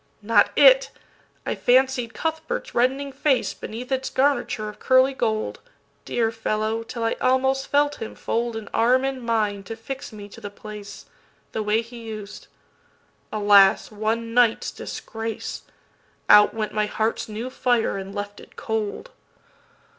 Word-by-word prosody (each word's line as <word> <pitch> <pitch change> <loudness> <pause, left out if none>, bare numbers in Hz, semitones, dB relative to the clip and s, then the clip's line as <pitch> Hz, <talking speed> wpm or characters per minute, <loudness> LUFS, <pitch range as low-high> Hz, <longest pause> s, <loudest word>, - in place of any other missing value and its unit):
Not 230 +2 +4
it! - - +7 0.6
I - - -1
fancied 250 -1 +2
Cuthbert's 320 0 -3
reddening 270 +3 +1
faceBeneath 260 -3 -1
its 265 0 -1
garniture 245 -5 0
of 210 - -9
curly 260 +1 +4
gold, 220 -4 -1 0.5
Dear 225 -2 0
fellow, 220 0 -1
till 230 +1 -6
I 225 - +1
almost 265 +1 +2
felt 290 0 +1
him 225 - -6
foldAn 230 -2 -3
arm 250 +3 +3
in 270 -1 -3
mine 215 -4 0
to 225 - -6
fix 265 +4 -7
me 205 -2 -9
to - - -13
the 205 - -6
place, 210 0 -10 0.5
That 220 - -2
way 215 +2 +1
he 235 0 -11 0.2
us'd. 205 0 -11 0.8
Alas, 205 -2 +5
one 225 +2 -2
night's 240 -2 +3
disgrace! 225 0 -6 0.7
Out 210 0 +7
went 215 -1 -3
my 215 0 +1
heart's 220 +1 -2
new 225 +4 -5
fire 240 -6 +1
and 195 0 -7
left 205 0 -5
it - - -16
cold. 220 - -3
230 Hz, 140 wpm, -24 LUFS, 215-260 Hz, 0.8 s, it